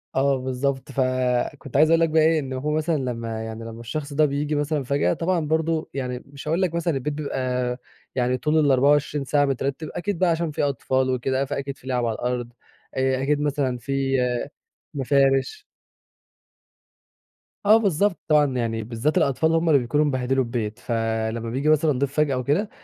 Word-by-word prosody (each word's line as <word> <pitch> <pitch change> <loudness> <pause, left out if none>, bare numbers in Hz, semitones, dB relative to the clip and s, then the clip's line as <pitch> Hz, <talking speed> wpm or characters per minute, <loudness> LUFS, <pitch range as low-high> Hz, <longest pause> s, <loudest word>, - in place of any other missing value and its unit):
آه، 135 0 +3
بالضبط، 130 +1 -2
فكنت 130 +1 -1
عايز 155 +2 +6
أقول 165 0 +5
لك 165 - +3
بقى 160 +1 +3
إيه، 160 0 +4
إن 135 -3 -5
هو 135 +4 -2
مثلًا 155 +1 +1
لمّا 115 -4 -3
يعني 110 0 -7
لمّا 115 0 -8
الشخص 140 +5 -5
ده 155 +2 +4
بييجي 145 +1 -1
مثلًا 145 0 -1
فجأة 130 -9 +1
طبعًا 175 +1 0
برضو 160 +1 0
يعني 125 -2 -4
مش 140 +1 -11
هاقول 165 +4 +1
لك 180 -3 +1
مثلًا 170 0 0
البيت 140 +2 -2
بيبقى 125 -4 -2 0.4
يعني 125 0 +1
طول 155 +3 +1
ال24 145 0 +3
ساعة 145 +2 +2
مترتب، 140 +3 -2
أكيد 195 -1 -3
بقى 185 - +3
عشان 165 -1 0
في 150 - -2
أطفال 130 -1 0
وكده 130 +1 0
فأكيد 140 0 -4
في 130 - -16
لعب 125 -2 0
على 115 -1 -1
الأرض، 120 0 -3 0.4
آآ، 130 0 +1
أكيد 145 +1 +1
مثلًا 140 -4 0
في 135 +2 -1 0.8
مفارش. 135 - +1 2.0
آه، 215 +2 +7
بالضبط، 200 -2 +1
طبعًا 145 -4 +3
يعني 115 -2 -1
بالذات 120 +7 -1
الأطفال 150 +4 +2
هم 165 0 +2
اللي 145 -3 +6
بيكونوا 140 +5 +1
مبهدلوا 130 -1 +1
البيت، 115 -3 -4
فلما 115 0 -2
بييجي 135 +6 0
مثلًا 155 0 +4
ضيف 140 0 -1
فجأة 150 -3 +2
وكده، 145 - 0
140 Hz, 175 wpm, -24 LUFS, 125-150 Hz, 2.0 s, آه